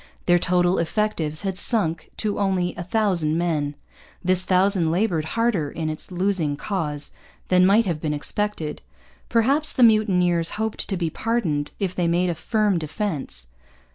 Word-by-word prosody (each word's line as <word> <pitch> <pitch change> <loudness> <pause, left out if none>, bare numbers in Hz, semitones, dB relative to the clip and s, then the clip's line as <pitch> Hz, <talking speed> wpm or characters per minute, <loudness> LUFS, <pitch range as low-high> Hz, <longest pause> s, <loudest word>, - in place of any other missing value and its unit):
Their 175 0 +4
total 180 0 +2
effectives 165 -3 -1
had 190 -2 -2
sunk 170 -9 0
to 210 -2 -1
only 190 -3 0
a - - -5
thousand 180 -5 0
men. 155 -4 -1 0.5
This 185 0 +3
thousand 185 -2 +2
laboured 170 -3 0
harder 220 -11 +1
in 155 0 -3
its 155 - -5
losing 180 -5 0
cause 150 -6 -3 0.4
than 185 0 +5
might 215 +4 +4
have 165 -5 -2
been 155 - -1
expected. 155 +1 -2 0.5
Perhaps 275 +7 +3
the 255 - +3
mutineers 180 -7 +3
hoped 220 0 -2
to 195 - -1
be 170 -2 -1
pardoned 170 -12 -1
if 190 -3 -2
they 175 -2 0
made 175 +1 +2
a - - -1
firm 205 +2 0
defence. 155 - -4
180 Hz, 155 wpm, -23 LUFS, 160-205 Hz, 0.5 s, than